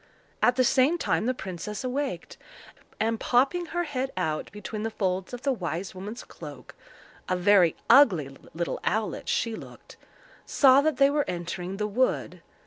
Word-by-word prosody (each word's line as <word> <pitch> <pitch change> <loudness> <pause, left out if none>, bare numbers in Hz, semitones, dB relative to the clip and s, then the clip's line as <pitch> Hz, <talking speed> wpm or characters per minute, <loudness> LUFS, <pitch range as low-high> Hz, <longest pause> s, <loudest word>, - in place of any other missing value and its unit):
At 245 - +4
the 255 - +3
same 265 +7 +3
time 200 - 0
the 255 - +2
princess 195 +2 -6
awaked, 265 +2 -3 0.6
and 225 0 0
popping 280 +8 +2
her 350 +2 -2
head 270 -4 -3
out 155 -4 -2
between 210 +1 -6
the 225 - -2
folds 190 -3 -2
of 245 0 -7
the 275 -1 +2
wise 180 -3 -4
woman's 205 +6 -7
cloak—a 155 +4 -9
very 180 -3 +4
ugly 185 - +5 0.2
little 170 +1 -2
owlet 220 0 -2
she 230 -1 0
looked—saw 275 - 0
that 310 -2 0
they 275 +1 +5
were 290 0 +1
entering 180 +2 -4
the 210 - -1
wood. 235 +5 -1
220 Hz, 150 wpm, -27 LUFS, 185-265 Hz, 0.6 s, ugly